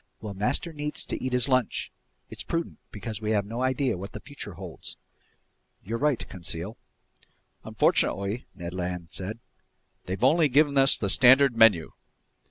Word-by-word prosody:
"Well, 105 -2 -6
master 125 - -1
needs 150 0 -3
to - - -5
eat 130 - -2
his 125 +1 +3
lunch! 130 -3 0 0.4
It's - - -6
prudent, 165 0 -4
because 110 +1 -7
we 110 - -3
have 100 -2 +1
no 115 +4 -5
idea 130 -5 0
what 100 - -8
the - - -6
future - - -8
holds." - - -9 0.9
"You're 115 +4 -4
right, 145 -4 0
Conseil." 90 +3 -3 0.9
"Unfortunately," 100 +5 0
Ned 85 -2 -7
Land 90 -2 -4
said, 100 +4 -3 0.7
"they've 95 +5 -4
only 155 +3 +4
given 145 +2 +3
us 135 0 +5
the 100 - -2
standard 130 +5 +6
menu." 110 -8 +5
115 Hz, 155 wpm, -26 LUFS, 95-135 Hz, 0.9 s, standard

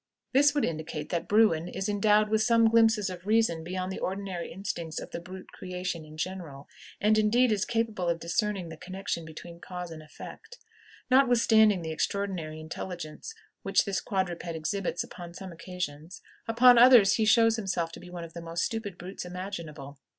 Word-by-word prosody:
This 285 +2 +5
would 290 - +2
indicate 155 -1 -4
that 170 0 -2
Bruin 205 -6 +3
is 190 +2 -4
endowed 210 +1 +3
with 220 0 +2
some 230 0 +4
glimpses 225 -3 +4
of 185 0 -7
reason 215 -7 +2
beyond 185 +2 -4
the - - -5
ordinary 190 -2 -4
instincts 170 -4 -4
of - - -9
the - - -4
brute 185 +2 -11
creation 180 -2 -5
in 155 0 -13
general, 160 -5 -5 0.3
and, 215 +1 +3
indeed, 235 +3 +3
is 210 -2 +1
capable 225 -6 -1
of 170 0 0
discerning 185 +1 -1
the 160 - -9
connection 185 -1 -5
between 170 +2 -10
cause 180 -1 -7
and 160 -1 -8
effect. 155 - -11 0.5
Notwithstanding 230 -7 +5
the 160 - -4
extraordinary 170 -3 -2
intelligence 170 - -7 0.3
which 195 0 +2
this 195 -1 -1
quadruped 180 -3 -2
exhibits 175 +3 -2
upon 175 -1 -10
some 190 0 -8
occasions, 170 -1 -7 0.2
upon 240 +1 +6
others 240 -5 +7
he 220 - +2
shows 225 +1 +5
himself 180 -6 -2
to - - -10
be 180 - -12
one 175 -1 -7
of 165 -1 -10
the 170 - -7
most 165 0 -3
stupid 220 -6 -3
brutes 185 +2 -7
imaginable. 170 -6 -7
185 Hz, 175 wpm, -28 LUFS, 170-215 Hz, 0.5 s, others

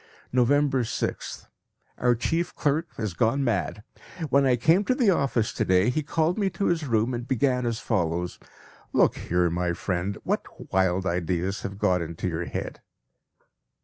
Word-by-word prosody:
November 135 +2 +3
6th. 115 - -3 0.5
Our 120 0 +3
chief 165 +9 -1
clerk 155 +3 0
has 110 -5 -2
gone 120 +9 +1
mad. 105 -3 -1 0.5
When 140 0 +4
I 125 - +4
came 160 - +3
to 255 - +2
the 240 -6 +4
office 135 - +1
to - - 0
day 95 +5 +3
he 155 - 0
called 160 +5 0
me 200 -2 +2
to 200 - 0
his 165 -4 0
room 115 +1 +1
and 120 +1 -4
began 125 -1 +1
as 115 -1 -1
follows: 90 -4 -1 0.5
"Look - - +4
here, 90 -1 0
my 85 0 0
friend, 90 +3 -2
what - - -4
wild 95 0 +2
ideas 90 +1 -1
have 100 0 -5
got 90 -3 +2
into 85 +2 -4
your 85 0 -2
head?" - - -5
115 Hz, 165 wpm, -26 LUFS, 90-140 Hz, 0.5 s, When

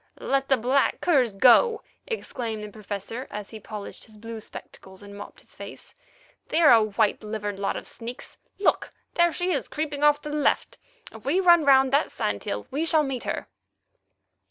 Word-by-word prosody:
"Let 275 0 0
the 265 - +4
black 255 +4 +1
curs 260 - +2
go," 425 - +5 0.2
exclaimed 235 - -4
the 210 - -8
Professor 210 +4 -6
as 210 -1 -7
he 220 - -8
polished 210 -1 -8
his 215 -1 -17
blue 225 +1 -8
spectacles 190 -2 -12
and 200 0 -11
mopped 205 - -11
his - - -17
face. - - -11 0.5
"They 320 - 0
are 310 -7 +7
a 225 - +6
white 215 0 0
livered 210 -2 -4
lot 200 - -1
of - - -7
sneaks. 240 +3 -8 0.2
Look! 395 - +1 0.2
There 345 0 +3
she 360 +2 -1
is, 280 -7 -1
creeping 295 -1 -3
off 295 0 +5
to 300 - -5
the - - -3
left. 295 - 0 0.3
If 220 -1 -13
we 305 +9 +1
run 345 -4 +5
round 270 -1 +5
that 285 +3 +3
sand 100 -1 -3
hill 105 +1 -3
we 290 +4 -1
shall 320 -2 +3
meet 270 -4 -4
her." - - -3
250 Hz, 190 wpm, -25 LUFS, 210-295 Hz, 0.5 s, are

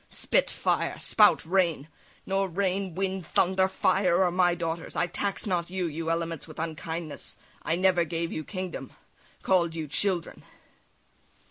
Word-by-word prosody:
spit, - - +1
fire! - - 0
spout, 210 -8 +4
rain! 170 -5 +1 0.4
Nor 195 0 0
rain, 190 0 -1
wind, 190 -2 -2
thunder, 190 +1 +3
fire, 190 -1 +2
are 180 - +2
my 175 -1 +3
daughters; 165 -1 -4
I - - +2
tax 200 +3 -3
not 175 -4 -1
you, 185 -1 -2
you 165 0 -3
elements, 165 -2 -2
with 155 - -12
unkindness; 160 -1 -5 0.2
I 165 - 0
never 180 -1 +3
gave 165 +1 -3
you 155 - -3
kingdom, 185 -7 -6 0.5
call'd 170 -3 +2
you 160 -2 -4
children." 175 +3 0
175 Hz, 145 wpm, -28 LUFS, 165-190 Hz, 0.5 s, spout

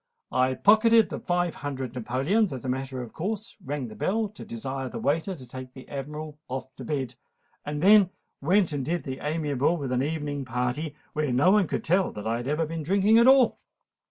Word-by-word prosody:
I 130 0 +2
pocketed 220 - +5
the - - -4
five 175 -2 0
hundred 135 -4 -5
napoleons, 135 - +1
as 130 -1 -6
a - - -2
matter 130 0 -3
of 115 - -11
course—rang 180 - -4
the 110 - -9
bell 215 - 0
to 210 - -11
desire 130 +3 -5
the - - -6
waiter 165 +6 0
to 130 -6 -11
take 130 +1 -9
the 130 - -11
Admiral 150 +2 -6
off 130 0 -6
to - - -7
bed—and 145 +2 -6
then 200 -1 +7 0.3
went 180 +3 +3
and 140 -2 -2
did 170 +4 -2
the 130 -1 -5
amiable 150 0 0
at 130 - -3
an 125 0 +1
evening 145 -1 -2
party, 125 +5 -2 0.2
where 150 -3 0
no 135 +9 +4
one 205 -3 +4
could - - -2
tell 185 +3 +2
that 105 - -7
I 115 +1 0
had 120 +2 -5
ever 150 +3 +1
been 165 +1 -4
drinking 200 +7 +4
at 235 - +6
all." 265 -3 +5
150 Hz, 200 wpm, -27 LUFS, 130-180 Hz, 0.3 s, then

